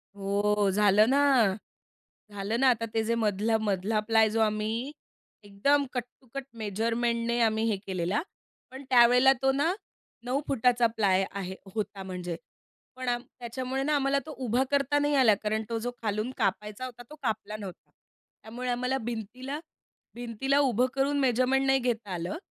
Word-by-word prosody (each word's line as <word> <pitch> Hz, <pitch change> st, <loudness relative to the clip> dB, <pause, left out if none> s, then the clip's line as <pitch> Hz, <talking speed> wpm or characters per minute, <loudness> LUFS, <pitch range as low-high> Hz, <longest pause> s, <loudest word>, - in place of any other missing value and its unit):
हो 205 Hz, 0 st, +1 dB
झालं 210 Hz, +2 st, +4 dB
ना. 280 Hz, +2 st, +4 dB, 1.1 s
झालं 205 Hz, +4 st, -2 dB
ना 265 Hz, -, +6 dB
आता 230 Hz, 0 st, -4 dB
ते 225 Hz, -, +1 dB
जे 230 Hz, +1 st, 0 dB
मधला 220 Hz, 0 st, +1 dB
मधला 205 Hz, +1 st, 0 dB
प्लाय 225 Hz, -1 st, +4 dB
जो 225 Hz, +1 st, 0 dB
आम्ही 220 Hz, +4 st, -1 dB, 0.5 s
एकदम 280 Hz, +9 st, +1 dB
कट 250 Hz, -, -1 dB, 0.2 s
टू 255 Hz, -, -24 dB
कट 275 Hz, -1 st, -5 dB
मेजरमेंटने 230 Hz, +3 st, -1 dB
आम्ही 220 Hz, -1 st, +2 dB
हे 205 Hz, -, 0 dB
केलेला. 185 Hz, -, -1 dB, 0.5 s
पण 265 Hz, +2 st, -9 dB
त्यावेळेला 250 Hz, +2 st, +6 dB
तो 270 Hz, 0 st, +3 dB
ना 290 Hz, +6 st, +1 dB, 0.5 s
9फूट 260 Hz, -1 st, -1 dB
चा 235 Hz, -, +5 dB
प्लाय 200 Hz, -4 st, +1 dB
आहे 190 Hz, -1 st, -5 dB, 0.2 s
होता 205 Hz, -2 st, -3 dB
म्हणजे, 180 Hz, -2 st, -5 dB, 0.6 s
पण 255 Hz, -1 st, -3 dB, 0.3 s
त्याच्यामुळे 255 Hz, +3 st, -3 dB
ना 300 Hz, +1 st, +1 dB
आम्हाला 275 Hz, 0 st, +2 dB
तो 315 Hz, -, -7 dB
उभा 240 Hz, +3 st, +2 dB
करता 285 Hz, +1 st, +2 dB
नाही 290 Hz, 0 st, +1 dB
आला. 240 Hz, -6 st, +5 dB
कारण 215 Hz, +1 st, 0 dB
तो 230 Hz, -, -1 dB
जो 245 Hz, +2 st, -3 dB
खालून 215 Hz, +3 st, -1 dB
कापायचा 210 Hz, +4 st, -2 dB
होता 245 Hz, -1 st, -9 dB
तो 305 Hz, -, -10 dB
कापला 215 Hz, -2 st, -2 dB
नव्हता 195 Hz, -4 st, -10 dB, 0.5 s
त्यामुळे 245 Hz, +3 st, -5 dB
आम्हाला 250 Hz, +2 st, 0 dB
भिंतीला, 245 Hz, +5 st, -5 dB, 0.6 s
भिंतीला 245 Hz, +4 st, 0 dB
उभं 250 Hz, -3 st, +3 dB
करून 280 Hz, +1 st, +1 dB
मेजरमेंट 260 Hz, +1 st, +2 dB
नाही 270 Hz, 0 st, +4 dB
घेता 235 Hz, -4 st, -2 dB
आलं. 175 Hz, -, -3 dB
230 Hz, 155 wpm, -28 LUFS, 210-260 Hz, 1.1 s, ना